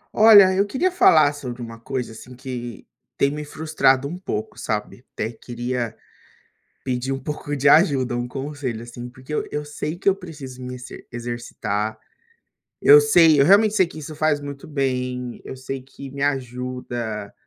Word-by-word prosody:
Olha, 205 -3 +8
eu 195 +1 +3
queria 310 - 0
falar 155 - +5
sobre 125 -4 -7
uma 115 -1 -8
coisa, 125 0 -4
assim, 125 +3 -12
que 125 -3 -7 0.3
tem 140 - +3
me 150 +1 -5
frustrado 150 -3 +1
um 165 - -5
pouco, 145 - -5
sabe? 105 +3 -4
Até 110 - -2
queria 120 0 -4 0.9
pedir 130 0 -2
um 135 - -2
pouco 145 +1 -5
de 145 0 +1
ajuda, 140 -6 +4
um 120 0 -3
conselho, 135 -3 -4
assim, 120 +1 -8
porque 130 +4 -10
eu - - -1
eu 150 0 -3
sei 150 +2 -5
que 190 - -6
eu 195 - +5
preciso 145 -9 -10
me 125 0 -6
exer 125 0 -10
exercitar, 115 -3 -3 0.8
eu 145 +1 +9
sei, 155 +1 +5
eu 140 - +6
realmente 205 +4 +5
sei 185 -4 +4
que 165 - -12
isso 155 +1 -7
faz 150 -1 +1
muito 140 -1 -8
bem, 125 -4 -2
eu - - -7
sei 130 +1 -6
que 135 +1 -11
me 140 0 -7
ajuda 125 -5 -3
135 Hz, 170 wpm, -22 LUFS, 120-150 Hz, 0.9 s, eu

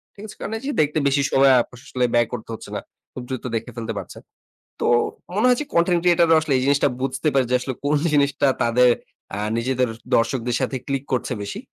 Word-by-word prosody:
ঠিক 200 - -11
আছে? 210 - -11
কারণ 215 - -5
এই 270 +5 -4
দেখতে 150 +1 +1
বেশি 140 0 +2
সময় 135 0 +5
আসলে 125 +1 -3
ব্যয় 120 -1 +3
করতে 115 -2 -6
হচ্ছে 110 - -9
না। - - -3 0.3
খুব 125 - -6
দ্রুত 130 -2 -4
দেখে 115 0 -4
ফেলতে 115 -2 -4
পারছেন। - - -8 0.6
তো - - +1 0.5
মনে 215 +5 +3
হচ্ছে 250 +4 +2
কনটেন্ট 170 +1 +3
ক্রিয়েটর 175 -1 +4
রা - - +7
আসলে 155 -3 -1
এই - - 0
জিনিসটা 140 0 +3
বুঝতে 135 +3 -1
পারে 135 -2 +3
যে, - - +4
আসলে 130 +1 -4
কোন 145 +1 +2 0.2
জিনিসটা 140 -1 +2 0.2
তাদের 125 +2 +4 0.5
আ - - -3 0.2
নিজেদের 125 +1 0 0.3
দর্শকদের 120 +1 0
সাথে 130 +1 -1
ক্লিক 135 -1 -2
করছে 125 0 -1
বেশি। 100 - -6
135 Hz, 205 wpm, -22 LUFS, 125-155 Hz, 0.6 s, রা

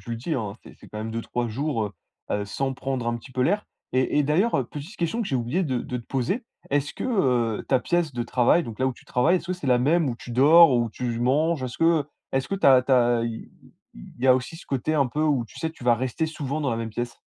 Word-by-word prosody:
tu - - -10
le 115 - -2
dis, 130 +9 -4
hein. 105 -5 -3
C'est - - -14
c'est - - -15
quand - - -9
même 110 +1 -4
2-3 115 +1 -3
jours 130 0 -1
heu 105 - -9 0.4
heu 105 0 0
sans 135 +6 -2
prendre 130 -2 -3
un 120 - 0
petit 120 +2 -13
peu 125 0 0
l'air. 205 +8 +1 0.3
Et 130 +3 +1
et - - +4
d'ailleurs, 160 +10 +2
heu 135 - 0
petite 150 - -9
question 175 +7 -1
que 220 - -2
j'ai 135 - 0
oublié 125 +10 -1
de 130 -6 -1
de 125 - -4
te 115 - -11
poser: 135 - -1 0.3
est-ce 145 +1 0
que - - -5 0.5
heu - - -7
ta 130 -2 +3
pièce 175 -4 0
de 120 - -1
travail, 125 +8 +3
donc 115 -2 -8
là 130 - +1
où 130 - 0
tu - - -19
travailles, 160 +9 +2
est-ce 170 - -5
que - - +1
c'est 180 -5 -6
la 125 -1 +4
même 155 +5 +2
où 120 - -3
tu 120 - -10
dors, 145 +4 +7
où 120 -1 +1
tu 115 +1 -4
manges? 145 +4 +1
Est-ce 125 -2 -5
que 165 -3 +3 0.3
est-ce 135 0 0
que 195 - -1
tu 195 - +1
as 130 -2 +8
tu 130 +1 0
as 120 -2 +4
i 115 -1 -6 0.4
il - - -13
y - - +4
a 130 - +7
aussi 130 +6 -3
ce - - -12
côté 140 +3 -1
un 140 -4 +3
peu 150 +5 -2
où, 145 -6 +2
tu 115 - -14
sais, 160 - -2
tu 160 - -16
vas 120 -1 +4
rester 130 +6 -2
souvent 155 -2 -4
dans 140 -3 0
la 115 - -1
même 115 -1 -4
pièce? 120 +2 -5
130 Hz, 285 wpm, -25 LUFS, 120-155 Hz, 0.5 s, as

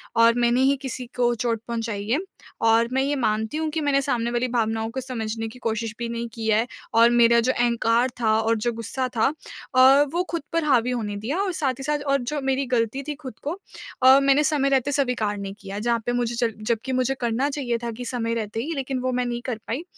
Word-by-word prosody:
और 230 0 +6
मैंने 240 +2 +3
ही 275 +1 +4
किसी 255 -1 -5
को 240 -1 +2
चोट 230 -1 -1
पहुँचाई 225 -3 -3
है, 260 +6 +2 0.4
और 225 +1 +4
मैं 265 - +2
ये 285 +1 0
मानती 220 0 -1
हूँ 315 0 -1
कि 315 +1 -2
मैंने 280 -2 +2
सामने 240 -4 -1
वाली 240 +1 0
भावनाओं 225 -2 -1
को 260 +2 -4
समझने 225 -3 -4
की 225 +3 -11
कोशिश 225 -1 -2
भी 235 - -2
नहीं 235 0 -3
की 225 -1 -6
है 220 - +4 0.4
और 230 +1 +6
मेरा 235 -1 +5
जो - - +4
अहंकार 235 0 +2
था, 220 -2 +3
और 225 +1 +2
जो 235 +3 -1
गुस्सा 230 +3 -3
था 220 - +3 0.5
अ, 265 +3 +7
वो 350 +1 +1
खुद 335 - -2
पर 330 - +1
हावी 250 -4 +2
होने 215 -4 -3
दिया। 235 - -3
और 400 -2 0
साथ 275 -5 0
ही - - -6
साथ 295 +1 0
और 275 -1 +2
जो 285 +4 -3
मेरी 270 0 0
ग़लती 245 +2 0
थी 300 - -3
खुद 265 -6 -10
को 320 +7 -3 0.4
अ, 260 +1 +8
मैंने 275 +1 +4
समय 295 -3 +2
रहते 275 +1 +1
स्वीकार 245 -7 0
नहीं 195 -1 -5
किया 200 0 -6
जहाँ 235 +2 +1
पे 245 - 0
मुझे 240 -1 -1
जब 230 -1 0 0.2
जबकि 235 +3 -2
मुझे 255 +1 +1
करना 240 +4 0
चाहिए 265 -5 -2
था 235 - -2
कि 245 +2 -7
समय 230 -1 -2
रहते 225 -1 -3
ही 325 +4 -3
लेकिन 270 -1 -2
वो 255 0 -1
मैं 250 0 0
नहीं 240 0 -3
कर 250 -4 -2
पाई 260 +8 -3
240 Hz, 235 wpm, -24 LUFS, 230-270 Hz, 0.5 s, अ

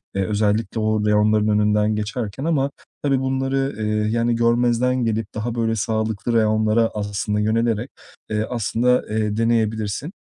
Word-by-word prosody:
Eee, 95 -1 0
özellikle 105 +2 0
o 110 -1 0
reyonların 105 0 +3
önünden 105 0 +2
geçerken 105 +4 -4
ama 140 -4 +1 0.3
tabii 135 -2 +2
bunları, 135 +1 -1
eee, 110 - -1 0.2
yani 115 +1 +1
görmezden 120 +2 +2
gelip 110 0 -2
daha 115 +2 -3
böyle 115 -1 0
sağlıklı 110 +1 -1
reyonlara 110 0 +2
aslında 105 0 -2
yönelerek, 115 +2 0 0.4
eee, 110 0 -1
aslında, 125 +1 +1
eee, 110 -1 -1
deneyebilirsin. 110 - 0
110 Hz, 135 wpm, -21 LUFS, 105-120 Hz, 0.4 s, reyonların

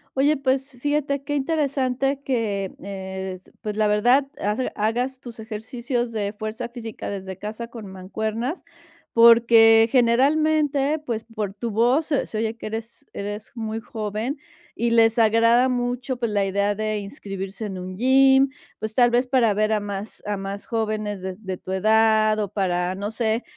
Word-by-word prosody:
Oye, 285 +3 +3
pues 270 0 -1
fíjate 290 -1 0
qué 290 +1 -2
interesante 275 -2 0
que, 210 -8 -2 0.6
es 185 0 -13
pues, 210 0 -4
la 215 -1 +3
verdad, 245 +7 +3
hace 210 +6 -1
hagas 245 +5 -1
tus 240 -2 -10
ejercicios 235 +2 -3
de 205 -2 -2
fuerza 220 +3 -5
física 235 -2 -7
desde 190 -2 -6
casa 215 +3 -6
con 230 -3 -9
mancuernas, 220 - -4 0.5
porque, 230 -1 +7
generalmente, 285 +4 +2
pues, 230 -2 -3
por 215 -4 -5
tu 230 +2 -4
voz, 245 +8 +2
se 285 -3 0
se 215 - -5
oye 225 +1 -2
que - - -9
eres 225 +2 -7
eres 205 +1 -6
muy 220 -1 -3
joven 220 +5 -4 0.4
y 235 +1 0
les 225 0 +4
agrada 230 +3 +4
mucho, 245 +1 -2
pues, 235 -2 -1
la 200 -1 +1
idea 200 +1 0
de 215 0 -1
inscribirse 200 -1 -6
en 190 -2 -6
un 185 +1 -6
gym, 265 +4 +5 0.3
pues, 220 0 -4
tal 240 -1 +5
vez 245 +1 +2
para 245 -5 +3
ver 215 +1 +1
a 215 - +2
más 205 +1 -6
a 205 0 -1
más 195 +1 -6
jóvenes 215 -3 -2
des 190 +2 -6
de 190 -1 -3
tu 185 - -8
edad 215 +2 +3
o 205 -3 -1
para, 180 -2 -1
no 205 +3 -4
sé, 225 0 0
225 Hz, 165 wpm, -23 LUFS, 210-250 Hz, 0.6 s, porque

